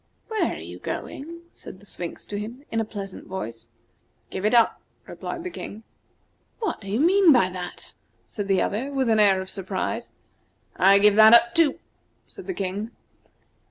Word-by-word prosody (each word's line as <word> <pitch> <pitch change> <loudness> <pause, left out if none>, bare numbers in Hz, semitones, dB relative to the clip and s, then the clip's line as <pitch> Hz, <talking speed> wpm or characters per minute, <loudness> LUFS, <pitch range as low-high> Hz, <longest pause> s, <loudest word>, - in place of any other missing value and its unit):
"Where 440 -1 0
are - - -7
you - - -9
going?" 335 +4 -6
said 185 - -12
the 205 - -18
Sphinx 175 -3 -6
to 205 - -5
him, 240 +7 -8
in 225 - 0
a - - -2
pleasant 200 -3 -8
voice. 115 -12 -6 0.6
"Give 190 +2 -4
it 215 - +2
up," 230 -1 +4 0.2
replied 340 - -6
the 365 - -5
King. 220 -7 -8 0.7
"What 440 - -3
do 200 - -8
you 210 +4 0
mean 360 +3 +6
by 240 -9 +4
that?" 180 -1 -7 0.3
said 205 -2 -5
the 195 -1 +2
other, 250 +7 -2
with 265 -3 0
an 220 -1 +3
air 200 -2 +5
of 190 - -6
surprise. 195 +4 -4 0.6
"I 195 +2 +6
give 205 0 +5
that 220 +1 +9
up, 235 0 +4
too," 320 -4 +3 0.5
said - - -12
the 375 - -2
King. 200 +3 -3
215 Hz, 180 wpm, -24 LUFS, 195-270 Hz, 0.7 s, that